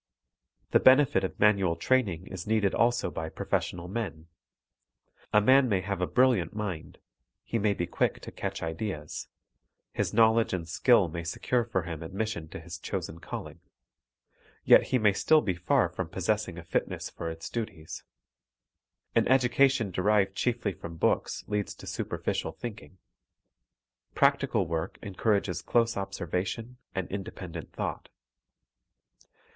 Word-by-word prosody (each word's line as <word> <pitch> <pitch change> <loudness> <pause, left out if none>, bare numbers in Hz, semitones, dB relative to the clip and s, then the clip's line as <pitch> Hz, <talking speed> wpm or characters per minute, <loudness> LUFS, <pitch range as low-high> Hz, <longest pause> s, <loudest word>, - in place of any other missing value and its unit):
The - - +6
benefit 130 -2 +5
of 95 - -4
manual 100 -5 +4
training 95 -3 +1
is 95 -1 -7
needed 105 -3 +2
also 120 +1 +2
by 80 0 -4
professional 85 +2 -2
men. 95 -6 -4 1.1
A 105 - +6
man 130 +4 +5
may 95 -3 +2
have 95 0 -3
a 90 - +1
brilliant 125 -9 +2
mind; 95 -7 -5 0.5
he 115 - -2
may 100 -1 +2
be 85 - -1
quick - - 0
to - - -8
catch - - -4
ideas; 80 -2 -4 0.7
his - - -1
knowledge 115 0 +4
and 85 -3 -3
skill 95 +4 +4
may 85 +1 -5
secure 120 +8 0
for 100 -6 -1
him 85 -2 -6
admission 95 0 -3
to 80 - -8
his 85 +1 -8
chosen 85 0 -5
calling; - - -7 1.0
yet - - +7
he 130 - +1
may 105 -4 +4
still 155 +10 +4
be 105 -9 -1
far 90 0 +2
from - - -5
possessing 105 -5 -1
a 85 - -7
fitness 85 - -2
for 85 - -5
its 80 0 -7
duties. 95 -9 -6 1.1
An - - +3
education 130 -3 +3
derived 95 +1 +2
chiefly 120 -5 0
from 85 -1 -9
books - - 0
leads 105 -1 -2
to - - -12
superficial - - -3
thinking. 105 -5 -8 1.2
Practical - - +3
work 80 +1 -3
encourages 100 -2 0
close 115 -1 +2
observation 95 +5 -3 0.2
and 95 -1 -2
independent 90 -4 -6
thought. - - -4
100 Hz, 140 wpm, -29 LUFS, 85-115 Hz, 1.2 s, yet